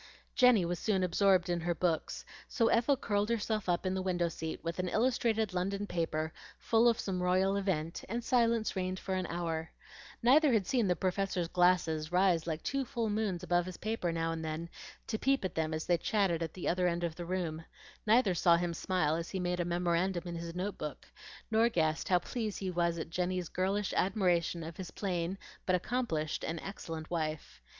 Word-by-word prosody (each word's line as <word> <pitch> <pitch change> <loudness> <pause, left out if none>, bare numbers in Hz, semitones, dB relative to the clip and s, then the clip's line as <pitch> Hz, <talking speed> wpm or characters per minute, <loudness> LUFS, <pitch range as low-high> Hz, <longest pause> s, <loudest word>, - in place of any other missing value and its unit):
Jenny 250 -8 +5
was 175 0 -2
soon 195 -4 +1
absorbed 185 0 +3
in 175 -1 0
her 170 +1 -1
books; 165 -1 -1 0.2
so 230 -2 +2
Ethel 255 +4 +3
curled 205 -2 0
herself 215 -3 -1
up 175 +1 +1
in 185 - +1
the 190 - -1
window 175 -2 0
seat 160 -1 -5
with 165 +2 -3
an 180 - 0
illustrated 225 -3 +1
London 195 +3 -1
paper 160 -4 -2 0.2
full 230 +1 +3
of 230 - 0
some 185 -2 -2
royal 185 +2 +2
event, 175 -5 -2
and 235 +3 -2
silence 230 -3 +2
reigned 185 0 -2
for 190 - -4
an 185 -1 -1
hour. 165 -2 -3 0.5
Neither 275 +3 +6
had 210 -4 +2
seen 240 -2 +1
the 180 - +2
Professor's 185 -1 -1
glasses 175 -3 +2
rise 180 -3 +3
like 160 -1 -3
two 275 0 -1
full 230 -3 -2
moons 205 -4 -1
above 175 0 +1
his 185 - -7
paper 215 -5 -2
now 165 0 -1
and 165 0 -4
then 160 +2 -4 0.4
to 220 - -3
peep 270 -5 +2
at 185 - -3
them 160 -1 -1
as 155 0 -3
they 175 -1 +2
chatted 195 -6 +1
at 165 -2 -4
the 185 - -4
other 180 +1 +2
end 170 0 -1
of 170 -2 -1
the 175 - -7
room; 170 -3 -2 0.4
neither 220 -3 +5
saw 170 0 +4
him 175 0 -1
smile 165 -2 0
as 165 +1 -4
he 190 - -3
made 180 0 -1
a 175 - 0
memorandum 175 +1 0
in 175 -1 -5
his 170 0 -6
note 190 +2 -3
book, 150 -3 -6 0.5
nor 225 +2 +4
guessed 160 -6 0
how 180 - +5
pleased 215 +2 -3
he 190 -2 -3
was 170 -1 +1
at 165 0 -5
Jenny's 180 0 -1
girlish 195 +2 -1
admiration 175 -3 +1
of 160 +1 -8
his 185 -3 -6
plain 180 -1 -2 0.3
but 185 - +4
accomplished 180 -7 -1
and 165 0 -3
excellent 165 -5 -6
wife. 155 - -3
180 Hz, 205 wpm, -32 LUFS, 170-205 Hz, 0.5 s, Neither